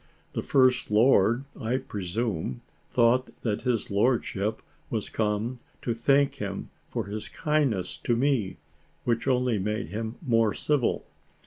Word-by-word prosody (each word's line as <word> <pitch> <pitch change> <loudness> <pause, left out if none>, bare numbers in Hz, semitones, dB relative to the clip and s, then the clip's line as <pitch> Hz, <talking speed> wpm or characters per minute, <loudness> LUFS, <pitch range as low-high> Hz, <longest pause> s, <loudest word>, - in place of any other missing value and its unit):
The - - -1
First 130 -2 +3
Lord, 115 +2 +4 0.2
I 115 +3 +1
presume, 100 - -3 0.3
thought 125 +1 +2
that 105 -3 0
his 125 -5 -1
lordship 105 -1 +1 0.3
was - - -3
come 110 +3 -1 0.3
to 120 - 0
thank 135 +4 +3
him 100 -5 -5 0.2
for - - -3
his 105 +1 -5
kindness 145 - 0
to 120 - 0
me, 120 - +1 0.5
which 115 +1 0
only 125 -4 +2
made 105 -3 -2
him 110 +4 -4
more 115 -4 +3
civil. 145 -5 0
115 Hz, 130 wpm, -27 LUFS, 105-130 Hz, 0.5 s, Lord